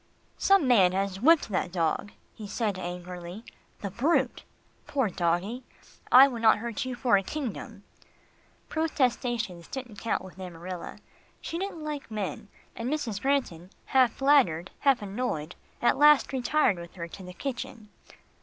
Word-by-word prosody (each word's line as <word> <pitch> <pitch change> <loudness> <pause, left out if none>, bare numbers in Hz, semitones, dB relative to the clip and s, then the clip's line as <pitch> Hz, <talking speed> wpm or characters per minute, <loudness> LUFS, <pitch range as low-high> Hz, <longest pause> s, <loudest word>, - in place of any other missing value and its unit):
"Some 390 -8 +4
man 195 -8 +5
has 195 0 -2
whipped 315 -1 +5
that 185 -2 -1
dog," 170 +3 -1 0.2
he 215 -2 -9
said 205 -2 -2
angrily. 180 +3 -7 0.4
"The 200 - -4
brute! 265 - +1 0.4
Poor 265 -7 0
doggie; 180 +9 -1 0.5
I 260 +2 +10
would 240 -4 -5
not 220 -2 +6
hurt 230 +1 -4
you 255 -1 -4
for 240 -4 +3
a - - +1
kingdom." 255 +2 -6 0.8
Protestations 240 - -1
didn't 250 -6 -7
count 230 - -1
with 190 0 -12
Amarilla. 180 0 -7 0.4
She 335 - -5
didn't 375 -5 -5
like 295 -4 -5
men, 210 -1 -4 0.3
and 235 +3 -3
Mrs. 235 -10 -2
Granton 250 -11 -1 0.2
half 255 -3 +5
flattered, 260 - +3
half 270 -6 +3
annoyed, 195 -7 -3 0.3
at 240 - +3
last 295 -2 +6
retired 260 - +2
with 170 0 -10
her 170 -2 -5
to 180 - -11
the 180 -1 -9
kitchen. 235 -2 -6
225 Hz, 145 wpm, -28 LUFS, 185-265 Hz, 0.8 s, I